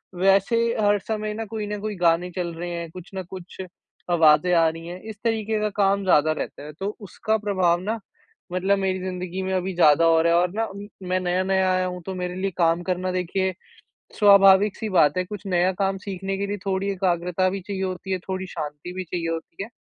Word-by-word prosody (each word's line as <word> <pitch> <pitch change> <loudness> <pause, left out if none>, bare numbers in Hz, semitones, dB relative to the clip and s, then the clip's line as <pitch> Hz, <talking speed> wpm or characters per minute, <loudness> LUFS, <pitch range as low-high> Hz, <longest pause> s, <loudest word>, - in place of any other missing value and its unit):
वैसे 195 +4 +3 0.3
हर 205 0 +4
समय 215 +1 -3
ना 225 +1 -4
कोई 215 0 -5
न 210 0 -4
कोई 215 -1 -3
गाने 175 0 +2
चल 175 -2 -3
रहे 175 +2 -5
हैं, 170 -1 -5
कुछ 180 +1 -11
न 190 - -3
कुछ 185 0 -9 0.5
आवाज़ें 165 +1 +5
आ 165 -1 +5
रही 165 +1 -8
हैं, 180 +1 -7
इस 220 -1 -8
तरीके 220 -2 0
का 210 - +1
काम 195 0 +2
ज़्यादा 155 -4 +4
रहता 155 - -5
है। 150 +1 -9
तो 200 +2 -3
उसका 215 +3 -1
प्रभाव 185 -5 +1
ना 220 +3 -2 0.5
मतलब 190 +2 +2
मेरी 190 -1 0
ज़िंदगी 185 0 -4
में 190 0 -2
अभी 185 +1 -1
ज़्यादा 165 -1 +5
हो 165 -1 +5
रहा 170 0 +3
है 170 - +5
और 180 0 0
ना 225 0 0 0.4
मैं 185 - +2
नया-नया 185 +1 +1
आया 185 0 +1
हूँ 180 0 -5
तो 190 -1 -4
मेरे 180 0 -4
लिए 195 +1 -2
काम 170 0 +3
करना 185 0 -1
देखिए 185 +1 -1 0.7
स्वाभाविक 200 -1 +6
सी 220 - -4
बात 175 -3 +4
है 185 - +1
कुछ 205 +1 -8
नया 180 0 +2
काम 195 0 +1
सीखने 195 0 -3
के 200 - -1
लिए 205 +1 -3
थोड़ी 195 +1 0
एकाग्रता 180 -1 0
भी 195 +1 -4
चाहिए 190 0 -5
होती 190 0 -3
है, 185 - 0
थोड़ी 190 +1 -5
शांति 150 +1 -6
भी 185 0 -4
चाहिए 170 -1 -3
होती 165 +3 -6
है। 220 - -11
185 Hz, 220 wpm, -24 LUFS, 175-195 Hz, 0.7 s, स्वाभाविक